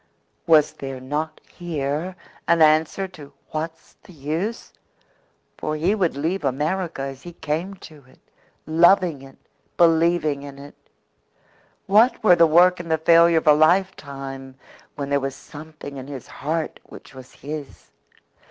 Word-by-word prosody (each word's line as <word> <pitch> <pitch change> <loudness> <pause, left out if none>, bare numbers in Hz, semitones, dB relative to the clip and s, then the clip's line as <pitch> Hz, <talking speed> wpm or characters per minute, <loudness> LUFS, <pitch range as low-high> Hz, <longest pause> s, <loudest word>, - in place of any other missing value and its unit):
Was 155 -3 +5
there 135 -1 -7
not 150 +4 -4
here 160 +1 -4 0.3
an 170 0 +3
answer 155 +5 +2
to 150 -6 -13 0.2
"What's 160 +1 -6
the 185 - -16
use?" 160 +10 -4 0.9
For 155 - -2
he 170 +6 +1
would 180 -9 0
leave 165 +6 -2
America 150 +3 -2
as 135 -1 -7
he 175 - -10
came 165 +5 -4
to 150 -4 -15
it 130 - -22 0.5
loving 170 -1 +3
it, 135 0 -15 0.4
believing 165 -3 +3
in 140 -1 -10
it. 140 +1 -12 1.1
What 220 +6 +3
were 180 -5 +7
the 170 -1 +5
work 175 +3 +5
and 170 -1 -7
the 160 - +2
failure 170 +1 +5
of 160 - 0
a 150 - +7
lifetime 140 -6 0 0.4
when 140 -1 -5
there 140 - +3
was 135 0 -4
something 155 -2 -11
in 130 0 -8
his 135 -4 -8
heart 160 +1 -4
which - - -14
was 130 -1 -13
his? 145 0 -9
155 Hz, 145 wpm, -22 LUFS, 140-170 Hz, 1.1 s, were